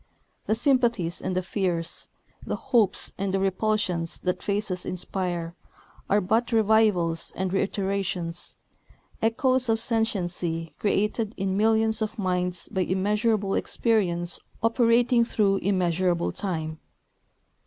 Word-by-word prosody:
The 215 - +2
sympathies 235 - +1
and 185 - -2
the 185 - 0
fears, 175 -3 -1 0.4
the - - -3
hopes 235 -7 +1
and 195 0 -1
the 195 - +1
repulsions 190 -3 0
that 180 0 -1
faces 200 -3 -2
inspire, 175 -2 -3 0.6
are 205 - +4
but 225 +5 +1
revivals 210 -7 +2
and 185 0 -2
reiterations, 195 -3 -2 0.6
echoes 255 +2 +2
of 225 0 +2
sentiency 180 -8 -1
created 210 +1 0
in 190 -1 -1
millions 220 +1 +2
of 215 - -2
minds 180 -2 -1
by 190 - -2
immeasurable 205 +2 +1
experience 175 -7 0 0.2
operating 235 +1 +4
through 205 -4 +2
immeasurable 180 -2 +1
time. 160 -5 -3
195 Hz, 110 wpm, -26 LUFS, 180-220 Hz, 0.6 s, are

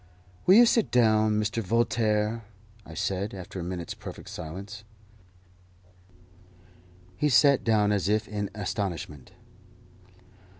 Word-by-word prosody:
"Will 185 - +8
you 240 +2 +8
sit 230 -1 +2
down, 110 -3 +3
Mr. 105 +2 -1
Voltaire?" 110 0 0 0.4
I 80 - -10
said, 100 +4 -2
after 95 0 -8
a - - -4
minute's 85 -1 -5
perfect - - -10
silence. 100 +7 -8 2.3
He 150 - +1
sat 140 +1 +5
down 105 -2 +2
as 100 -1 0
if 110 +1 +1
in 105 -1 -4
astonishment. 95 - -5
105 Hz, 115 wpm, -27 LUFS, 95-115 Hz, 2.3 s, Will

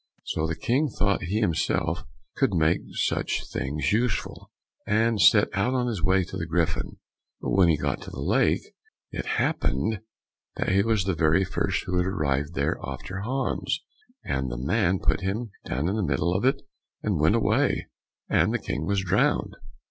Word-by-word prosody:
So 80 0 -1
the 80 - -2
King 140 - +1
thought 100 -3 0
he 105 +6 -1
himself 85 -2 0 0.3
could 95 - +1
make 80 0 +3
such - - -1
things 70 +5 -1
useful, 120 +2 -1 0.4
and 110 +1 +2
set 105 -2 +6
out 115 +7 +1
on 125 -1 +1
his 110 -7 -2
way 95 +2 +3
to 90 - -7
the 80 - -3
Griffin; 80 -1 -1 0.4
but - - -3
when 95 -2 +5
he 80 - +3
got - - -2
to - - -8
the - - -8
lake, - - +2 0.5
it - - -5
happened 105 - 0 0.6
that - - -1
he 95 +1 +4
was 110 -2 +1
the 95 0 0
very 80 +3 +3
first 100 +1 -1
who 90 0 -1
arrived 75 -5 0
there - - 0
after 95 +1 -5
Hans, 130 +6 -2 0.4
and 65 -1 -1
the - - -4
man 90 - +1
put - - 0
him 105 +4 -2 0.2
down 70 +6 -1
in 95 - 0
the - - 0
middle 85 +1 +1
of 95 +7 0
it 135 +1 +2 0.4
and 100 -7 0
went 80 +8 +4
away, 115 - +1 0.4
and - - +3
the - - +1
King 75 +4 -4
was 100 -1 +1
drowned. 90 - +1
95 Hz, 180 wpm, -26 LUFS, 80-105 Hz, 0.6 s, set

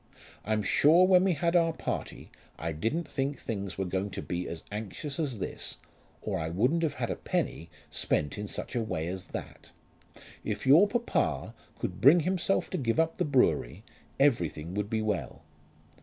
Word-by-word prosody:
I'm 110 0 0
sure 150 - +5
when 185 -1 +6
we 190 -2 +3
had 170 +3 0
our 165 -1 +4
party - - -5 0.3
I 85 +1 -3
didn't 115 - -2
think 140 +1 -2
things 100 -5 -4
were 95 - -1
going 95 +2 -2
to 100 0 -6
be 90 +1 -3
as 80 -1 -6
anxious 110 - -5
as 140 -7 -1
this, 95 - -5 0.5
or - - -2
I 80 0 -2
wouldn't 125 - +2
have 155 -4 0
had 125 -3 -2
a - - -1
penny 85 - -2 0.2
spent 75 - 0
in 105 0 -5
such - - -6
a 120 - +1
way 95 -8 -2
as 90 +1 -5
that. - - -8 0.7
If 105 -1 -3
your 155 +10 +7
papa 205 - -1 0.2
could - - -4
bring 155 +7 +7
himself 185 +3 +1
to 185 - -1
give 115 +1 0
up 165 0 +1
the - - +2
brewery, 125 - +2 0.4
everything 90 - +1
would 105 +1 -2
be 110 -1 0
well." 105 -3 -3
115 Hz, 180 wpm, -29 LUFS, -, 0.7 s, your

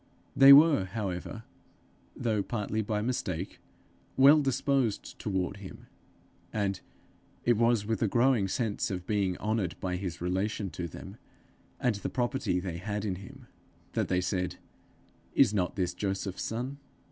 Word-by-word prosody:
They 135 0 +9
were, 145 -7 +8
however, 100 +1 -5 0.7
though 110 -4 0
partly 110 0 -2
by 105 0 -2
mistake, 95 -7 -3 0.6
well 140 +3 +7
disposed 135 -4 0
toward 95 -1 -2
him, 100 -2 -11 0.7
and 100 -3 -1 0.6
it 120 - +4
was 115 -1 +2
with 110 -1 -2
a 110 - +3
growing 120 -1 +3
sense 110 +1 -1
of 90 -2 -4
being 100 -3 0
honoured 105 -5 -1
by 90 -2 -2
his 90 -2 -5
relation 95 +2 -2
to 85 +3 -4
them, 80 - -10 0.6
and 125 - +2
the 100 - -4
property 120 -6 -1
they 90 -2 -4
had 105 +3 -3
in 95 -3 -2
him, 95 +1 -12 0.5
that - - 0
they 90 0 +1
said, 90 -1 -2 0.8
'Is 120 -6 +5
not 90 -4 0
this 90 -3 -1
Joseph's 95 -1 -3
son?' 125 +5 -4
105 Hz, 145 wpm, -29 LUFS, 95-120 Hz, 0.8 s, They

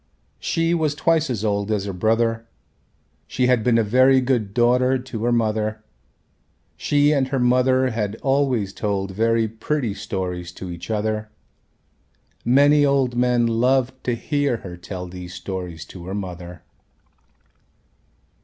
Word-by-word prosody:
She 165 +1 0
was 155 -3 0
twice 160 -1 +1
as 110 -4 -2
old 100 0 -1
as 105 -2 0
her 100 - -4
brother. 115 +4 0 0.8
She 125 - 0
had 125 -3 +3
been 120 -1 +3
a 115 - +3
very 130 +5 +4
good 125 -6 0
daughter 125 +3 +3
to 125 -3 -6
her 120 - +2
mother. 110 -2 0 0.9
She 145 0 +2
and 135 -3 +1
her 135 0 -2
mother 130 +1 +3
had 105 -2 -2
always 135 -8 +1
told 100 -2 -2
very 115 +3 +1
pretty 115 +2 -2
stories 90 -4 -4
to 90 -1 -7
each 85 +3 -8
other. 110 0 -2 1.1
Many 145 +4 +5
old 135 -3 +2
men 125 -1 +2
loved 130 +3 +1
to 120 - 0
hear 145 0 -1
her 90 -2 -7
tell 90 +1 -7
these 90 0 -9
stories 90 -3 -6
to 90 -1 -10
her 95 - -4
mother. 90 -3 -7
115 Hz, 145 wpm, -22 LUFS, 100-130 Hz, 1.1 s, Many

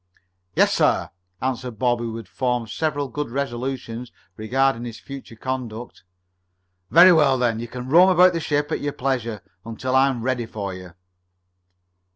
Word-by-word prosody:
"Yes, - - +4
sir," - - +1 0.3
answered 125 -3 -3
Bob, 120 +1 +1
who 115 -1 -4
had 115 -4 -9
formed 125 +2 -2
several 145 +2 -1
good 150 +1 -4
resolutions 125 -2 -4 0.2
regarding 125 +3 0
his 115 -2 -7
future 135 -4 -10
conduct. 120 -1 -5 0.9
"Very 180 +3 +8
well, 145 -5 +4
then. 120 -3 0
You 120 - -5
can 125 +1 -7
roam 175 +7 +6
about 180 0 +6
the 165 - -1
ship 145 -2 -1
at - - -1
your 145 -1 -2
pleasure 120 -6 -2 0.2
until 120 +3 -3
I 135 +1 +5
am 120 -4 -4
ready 125 -2 -1
for 100 -4 -5
you." 90 -2 -11
125 Hz, 160 wpm, -23 LUFS, 115-140 Hz, 0.9 s, Very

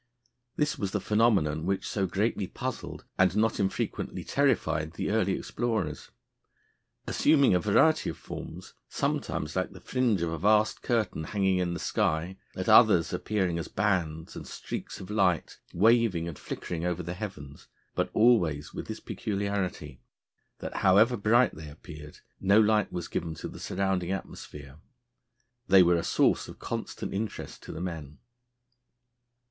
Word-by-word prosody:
This 150 0 0
was 100 -2 -2
the 105 - +1
phenomenon 95 -8 +2
which 95 0 -1
so 95 -2 -1
greatly 100 +1 -1
puzzled, 130 +6 -6
and 95 +1 +4
not 110 0 +2
infrequently 95 -1 -2
terrified, 80 0 +1
the 95 - -2
early 105 -3 +2
explorers. 110 -12 -3 1.0
Assuming 140 -7 +4
a 90 - +4
variety 155 - +3
of - - -6
forms, - - -9 0.2
sometimes 75 - -2
like 95 0 -1
the 95 - -11
fringe 115 -4 0
of 85 - -1
a 80 - -4
vast 105 +3 +3
curtain 110 -9 -1
hanging 95 -1 +1
in 90 -1 -1
the - - -5
sky, 85 +4 -1 0.2
at - - -4
others - - +6
appearing 95 -5 -1
as 85 - -4
bands 85 -6 -1
and - - -8
streaks - - -6
of 95 +1 -8
light, 95 -6 +1
waving 105 -4 +3
and 85 - -7
flickering 85 -2 -5
over 90 0 -1
the 85 +2 -4
heavens, 75 -8 -8 0.3
but - - -1
always 90 -11 +3
with - - -6
this - - -5
peculiarity, 100 -9 -3 0.6
that - - -5
however 105 +6 +5
bright 115 +3 +3
they 80 -1 -9
appeared, 75 0 -12 0.2
no 100 +2 +4
light 110 -1 +3
was 85 -1 -4
given 80 -1 -3
to - - -6
the - - -10
surrounding 95 -2 -1
atmosphere, 75 -7 -7 0.9
they 95 -1 +7
were 85 0 +4
a 85 - 0
source - - +2
of - - -10
constant - - -5
interest 105 +2 -5
to - - -9
the 80 - -7
men. 80 -5 -6
95 Hz, 155 wpm, -28 LUFS, 85-105 Hz, 1.0 s, they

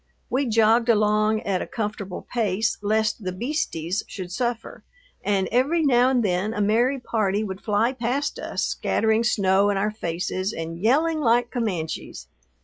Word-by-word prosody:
We 265 +1 +1
jogged 225 +1 +3
along 215 0 +3
at 195 -2 -1
a - - -4
comfortable 210 -4 -5
pace 220 -2 0
lest 215 +1 0
the 185 - -2
"beasties" 195 - -2
should 185 -3 -7
suffer, 235 +2 -3 0.4
and 195 -2 +1
every 280 +8 +2
now 250 -2 +4
and 250 -3 +2
then 200 +3 0
a - - -3
merry 235 +6 +2
party 215 -4 0
would 190 -2 -6
fly 220 +3 +1
past 260 +3 -2
us - - -3
scattering 220 +1 +1
snow 200 -3 +3
in 200 - 0
our 210 +2 0
faces 185 +1 -3
and 165 +1 -5
yelling 310 +8 +2
like 240 -3 +2
Comanches. 175 - -3
215 Hz, 155 wpm, -24 LUFS, 195-240 Hz, 0.4 s, now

